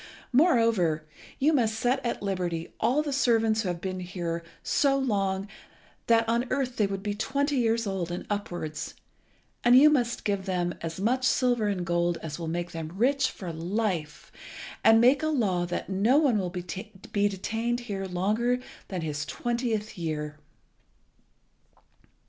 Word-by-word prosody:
Moreover, 230 - +3 0.3
you 300 +4 +3
must 225 -6 +2
set 250 +3 +1
at 235 -4 -2
liberty 180 -4 -2
all 255 +7 +2
the 290 -2 -3
servants 225 -4 +3
who 205 - -3
have 175 -1 -3
been 185 +1 -4 0.7
so 275 -1 +2
long 195 -7 0
here 200 - -14 0.6
that 230 -1 +4
on 235 +2 +1
earth 255 -2 -1
they 210 - +3
would 195 0 -4
be 205 -1 -1
twenty 280 +6 0
years 230 -1 +2
old 190 -4 -2
and 175 - -5
upwards; 175 -7 -4 0.7
and 245 +1 +7
you 300 +3 +8
must 240 -5 0
give 200 -2 -1
them 175 -2 0
as 165 +2 -5
much 250 +6 +1
silver 245 -4 +2
and 190 -4 -1
gold 170 0 +1
as 155 0 -5
will 165 - -4
make 175 +1 -3
them 165 0 -6
rich 275 +7 +2
for 175 -4 -7
life, 175 -2 -2 0.5
and 225 0 +7
make 255 +5 +5
a 310 - 0
law 200 - +1
that 175 - -3
no 200 +8 +3
one 280 -8 +4
shall 185 -2 -2
be 195 +4 -3
detained 225 +5 -2
here 200 -5 -4
longer 210 +7 +1 0.3
than 185 -3 -4
his 150 -2 -3
twentieth 225 +1 -2
year." 150 -2 -3
205 Hz, 160 wpm, -27 LUFS, 175-240 Hz, 0.7 s, you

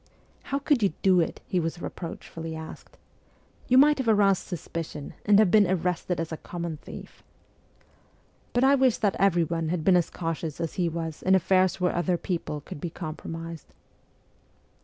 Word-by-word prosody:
' - - -34
How 275 - 0
could 285 -3 +1
you 195 -6 +2
do 185 -2 +5
it? 165 - -1
' - - -37
he 185 - 0
was 165 +1 -3
reproach 170 -1 -7
fully 165 -1 -6
asked. 160 0 -10 0.3
' - - -32
You 255 - +5
might 295 +1 +6
have 260 - -2
aroused 205 -3 +3
suspicion, 165 -4 -6
and 205 -1 +6
have 210 -4 +5
been 205 -4 +5
arrested 180 -1 -1
as 165 0 -3
a 160 - -4
common 170 -2 -5
thief.' - - -11 1.3
But 245 - +1
I 270 +1 +6
wish 260 -4 +3
that 205 -2 +1
everyone 170 -4 +2
had 170 -2 -1
been 190 +1 +5
as 175 -2 +2
cautious 165 -2 -4
as 165 -2 -3
he 175 -2 0
was 165 -1 -5
in 190 +1 +4
affairs 185 0 +2
where 180 -1 +1
other 175 +1 +1
people 165 -5 -3
could 145 - -9
be 175 - -3
compromised. 165 0 -7
175 Hz, 185 wpm, -27 LUFS, 165-195 Hz, 1.3 s, might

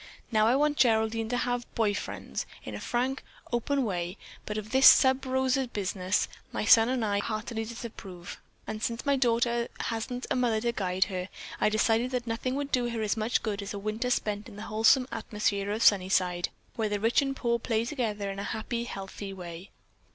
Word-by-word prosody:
Now 215 -1 +4
I 240 - +4
want 295 +1 +2
Geraldine 220 -1 +2
to 245 - 0
have 245 -1 -2
boy 215 -3 +2
friends - - -5 0.2
in - - -7
a - - -5
frank, 255 +2 -1 0.3
open 270 +4 +1
way, 180 -3 -3 0.3
but 210 - -3
of 215 0 -5
this 265 0 +7
sub 260 0 +6
rosa 260 0 +1
business, 190 -3 -1 0.2
my - - -2
son 225 +1 +7
and 255 -3 0
I 200 -1 +1
heartily 220 +2 -3
disapprove, 215 -6 -8 0.2
and 215 0 -5
since 230 +3 -2
my 280 -1 +3
daughter 235 -2 +2
hasn't 245 +3 -3
a - - +3
mother 240 -3 +2
to 235 +1 +1
guide 190 -4 +1
her, 185 -2 -4 0.3
I - - +3
decided 225 +3 +2
that 250 -2 -2
nothing 235 +3 -2
would 285 0 -3
do 245 -1 +1
her 230 -2 -2
as 210 - +1
much 220 +2 0
good 210 -2 -2
as 200 +1 -5
a - - -3
winter 215 +5 -2
spent 210 -2 -1
in 210 - -12
the 210 - -7
wholesome 225 +5 +4
atmosphere 210 -2 -1
of 215 +2 0
Sunnyside, 185 -3 +3 0.3
where 220 -2 0
the 205 0 -1
rich 225 +6 +3
and 275 -1 -2
poor 235 -2 0
play 225 -1 0
together 215 -7 -2
in 195 - -6
a - - -3
happy, 235 +3 -3
healthy 195 -2 -6
way. 175 0 -8
225 Hz, 200 wpm, -29 LUFS, 205-245 Hz, 0.3 s, this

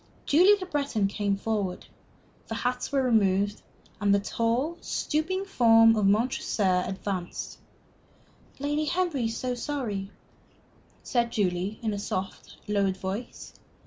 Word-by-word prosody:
Julie 365 +8 +6
Le 370 - -4
Breton 280 - -1
came 200 0 -1
forward. 200 -4 -2 0.6
The 225 - -4
hats 250 +2 -2
were 275 -1 +2
removed, 205 -4 +2 0.4
and 205 -1 +2
the - - +3
tall, 235 +11 -1
stooping 360 +6 -1
form 225 -9 +5
of 210 -2 +2
Montresor 200 -4 +1
advanced. 190 -2 -5 1.0
"Lady 295 +2 -1
Henry 340 -7 0
is 225 0 -2
so 255 -1 -2
sorry," 240 -7 -3 0.9
said 235 -2 0
Julie, 190 0 -1
in 220 -2 0
a 200 - -3
soft, 190 -1 -5
lowered 200 -2 +1
voice. 195 +6 -6
225 Hz, 125 wpm, -27 LUFS, 200-275 Hz, 1.0 s, Julie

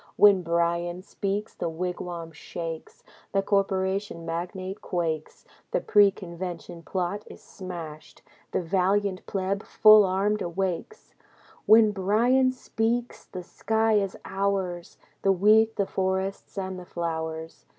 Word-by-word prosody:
When 200 -2 +6
Bryan 170 +1 0
speaks, 200 +2 -3
the - - -3
wigwam 175 0 -4
shakes. 165 +1 -7 0.3
The 195 0 +2
corporation 195 -2 0
magnate 185 +4 -4
quakes. 160 -3 -3 0.2
The - - +1
pre 205 -1 +5
convention 175 -2 -7
plot 185 +3 -2
is - - -11
smashed. 170 -5 -9 0.3
The - - -1
valiant 190 +2 +1
pleb 195 0 -1
full 215 -1 +7
armed 200 +3 +1
awakes. 185 - -3 0.5
When 220 -1 +7
Bryan 235 +7 +3
speaks, 240 -1 -2
the 185 - -7
sky 220 +4 0
is 200 -2 +1
ours, 195 -3 -2 0.2
The 195 - +3
wheat, 215 +4 +4
the 200 - +1
forests, 190 +1 -2
and 190 -1 -3
the 180 - -10
flowers. 160 -1 -4
190 Hz, 120 wpm, -26 LUFS, 175-205 Hz, 0.5 s, full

